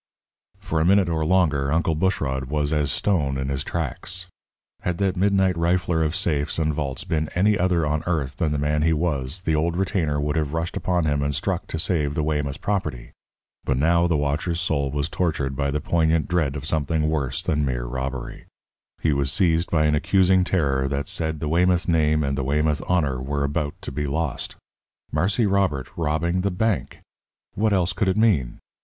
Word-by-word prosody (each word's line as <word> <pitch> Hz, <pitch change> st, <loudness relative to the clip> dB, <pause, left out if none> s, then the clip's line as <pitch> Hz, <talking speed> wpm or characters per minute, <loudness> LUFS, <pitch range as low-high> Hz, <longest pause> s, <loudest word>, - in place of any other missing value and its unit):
For 80 Hz, -, -2 dB
a -, -, +2 dB
minute 95 Hz, 0 st, +4 dB
or 80 Hz, -1 st, 0 dB
longer 75 Hz, -5 st, +2 dB
Uncle 85 Hz, +1 st, +1 dB
Bushrod 75 Hz, -6 st, -1 dB
was 75 Hz, +2 st, -1 dB
as 75 Hz, -2 st, +1 dB
stone 75 Hz, -9 st, +1 dB
in 65 Hz, 0 st, -2 dB
his 70 Hz, +1 st, -1 dB
tracks. 85 Hz, +4 st, -4 dB, 0.6 s
Had 90 Hz, -1 st, -2 dB
that 95 Hz, -1 st, 0 dB
midnight 95 Hz, -1 st, +2 dB
rifler 85 Hz, -1 st, +1 dB
of 80 Hz, +2 st, -1 dB
safes 80 Hz, -5 st, 0 dB
and 80 Hz, -1 st, +1 dB
vaults 70 Hz, -3 st, -3 dB
been 80 Hz, -1 st, -1 dB
any 105 Hz, +4 st, +3 dB
other 90 Hz, -3 st, +1 dB
on 75 Hz, +1 st, 0 dB
earth 75 Hz, -5 st, -1 dB
than 80 Hz, -4 st, 0 dB
the 75 Hz, -, 0 dB
man 75 Hz, +1 st, 0 dB
he 80 Hz, +1 st, +3 dB
was, 75 Hz, 0 st, -2 dB
the 80 Hz, -, 0 dB
old 80 Hz, +3 st, 0 dB
retainer 85 Hz, -6 st, 0 dB
would 75 Hz, +1 st, -1 dB
have 75 Hz, -2 st, -1 dB
rushed 80 Hz, +2 st, -2 dB
upon 90 Hz, -3 st, 0 dB
him 70 Hz, -2 st, +1 dB
and 70 Hz, 0 st, -1 dB
struck -, -, -2 dB
to -, -, -4 dB
save 80 Hz, -4 st, 0 dB
the 75 Hz, -, 0 dB
Weymouth 75 Hz, -2 st, -2 dB
property. 95 Hz, -12 st, -2 dB, 0.5 s
But 65 Hz, -, 0 dB
now 85 Hz, +4 st, +3 dB
the 85 Hz, -3 st, +1 dB
watcher's 75 Hz, +4 st, -1 dB
soul 75 Hz, -6 st, 0 dB
was 70 Hz, +2 st, -1 dB
tortured 80 Hz, -6 st, -1 dB
by 70 Hz, 0 st, -1 dB
the 75 Hz, +2 st, -1 dB
poignant 80 Hz, 0 st, +1 dB
dread 80 Hz, -5 st, 0 dB
of 70 Hz, 0 st, -5 dB
something 75 Hz, 0 st, 0 dB
worse 70 Hz, -5 st, -1 dB
than 75 Hz, 0 st, 0 dB
mere 60 Hz, -3 st, -2 dB
robbery. 65 Hz, +1 st, -5 dB, 0.6 s
He 80 Hz, -, +2 dB
was 70 Hz, -1 st, 0 dB
seized 85 Hz, -1 st, +2 dB
by 75 Hz, -2 st, +2 dB
an 75 Hz, -, +3 dB
accusing 95 Hz, +3 st, +3 dB
terror 70 Hz, -8 st, +1 dB
that 70 Hz, +1 st, -2 dB
said 80 Hz, -1 st, -1 dB
the 75 Hz, -, -3 dB
Weymouth 90 Hz, +3 st, +2 dB
name 75 Hz, -2 st, +2 dB
and 70 Hz, -1 st, -1 dB
the 70 Hz, -, -2 dB
Weymouth 75 Hz, +2 st, +1 dB
honour 70 Hz, -8 st, +1 dB
were 70 Hz, +2 st, -2 dB
about 75 Hz, +1 st, -2 dB
to -, -, -5 dB
be 75 Hz, +2 st, -3 dB
lost. 75 Hz, -1 st, -2 dB, 0.6 s
Marse 90 Hz, +6 st, 0 dB
Robert 95 Hz, -, 0 dB
robbing 85 Hz, +3 st, 0 dB
the 100 Hz, -, +1 dB
bank! 105 Hz, +2 st, -1 dB, 0.5 s
What 110 Hz, +2 st, +1 dB
else 95 Hz, -2 st, +2 dB
could 105 Hz, -, 0 dB
it 95 Hz, -, 0 dB
mean? 95 Hz, -, +2 dB
80 Hz, 195 wpm, -23 LUFS, 70-90 Hz, 0.6 s, minute